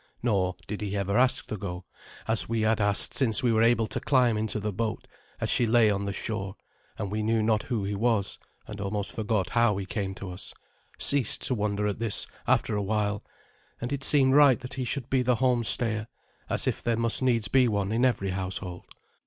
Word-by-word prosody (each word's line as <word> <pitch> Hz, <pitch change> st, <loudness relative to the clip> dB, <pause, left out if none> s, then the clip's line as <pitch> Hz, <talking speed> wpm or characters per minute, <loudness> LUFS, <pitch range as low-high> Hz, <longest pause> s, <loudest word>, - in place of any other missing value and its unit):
Nor 95 Hz, -6 st, +1 dB
did 105 Hz, -, -6 dB
he 100 Hz, -1 st, -3 dB
ever 100 Hz, 0 st, -1 dB
ask 130 Hz, +3 st, +2 dB
to 110 Hz, -, -5 dB
go, 90 Hz, -2 st, -6 dB, 0.4 s
as 110 Hz, -1 st, 0 dB
we 115 Hz, -1 st, 0 dB
had 110 Hz, 0 st, +1 dB
asked 100 Hz, 0 st, +1 dB
since 125 Hz, -3 st, +2 dB
we 120 Hz, -, +3 dB
were 110 Hz, 0 st, +2 dB
able 115 Hz, -1 st, +3 dB
to -, -, -3 dB
climb 125 Hz, -5 st, +2 dB
into 110 Hz, 0 st, -2 dB
the 105 Hz, 0 st, -3 dB
boat 110 Hz, +2 st, -3 dB, 0.3 s
as -, -, -2 dB
she 120 Hz, -, +3 dB
lay 110 Hz, -1 st, +4 dB
on 100 Hz, 0 st, -2 dB
the 100 Hz, -, -2 dB
shore; 100 Hz, -1 st, -4 dB, 0.4 s
and 100 Hz, -2 st, -4 dB
we 105 Hz, -, -2 dB
who 105 Hz, -, -2 dB
knew 110 Hz, 0 st, +1 dB
not 110 Hz, -1 st, +2 dB
who 115 Hz, -5 st, -3 dB
he 100 Hz, +1 st, -2 dB
was, 105 Hz, -1 st, 0 dB, 0.3 s
and 105 Hz, -1 st, -8 dB
almost 100 Hz, 0 st, -3 dB
forgot 105 Hz, -4 st, -2 dB
how 115 Hz, -4 st, +2 dB
he 100 Hz, -, -4 dB
came 95 Hz, -1 st, -4 dB
to 95 Hz, -2 st, -7 dB
us, 90 Hz, +2 st, -6 dB, 0.4 s
ceased 140 Hz, -6 st, +3 dB
to -, -, 0 dB
wonder 105 Hz, -2 st, -1 dB
at 105 Hz, -1 st, -2 dB
this 115 Hz, -3 st, +2 dB, 0.2 s
after 110 Hz, -, +2 dB
a 105 Hz, -, 0 dB
while; 105 Hz, 0 st, -1 dB, 0.6 s
and 120 Hz, +4 st, -4 dB
it 135 Hz, -1 st, -3 dB
seemed 135 Hz, -2 st, +4 dB
right 140 Hz, -4 st, +6 dB
that 125 Hz, -, -7 dB
he 130 Hz, -2 st, -3 dB
should 130 Hz, 0 st, -3 dB
be 130 Hz, -1 st, +1 dB
the 125 Hz, 0 st, +2 dB
home 125 Hz, 0 st, +1 dB
stayer, 110 Hz, -2 st, +1 dB, 0.4 s
as -, -, +2 dB
if -, -, -1 dB
there 115 Hz, -1 st, 0 dB
must 115 Hz, +1 st, 0 dB
needs 120 Hz, -4 st, +2 dB
be 130 Hz, -2 st, +3 dB
one 100 Hz, -2 st, -1 dB
in 115 Hz, +3 st, +1 dB
every 110 Hz, -7 st, +1 dB
household. 90 Hz, -1 st, -4 dB
110 Hz, 220 wpm, -27 LUFS, 100-120 Hz, 0.6 s, right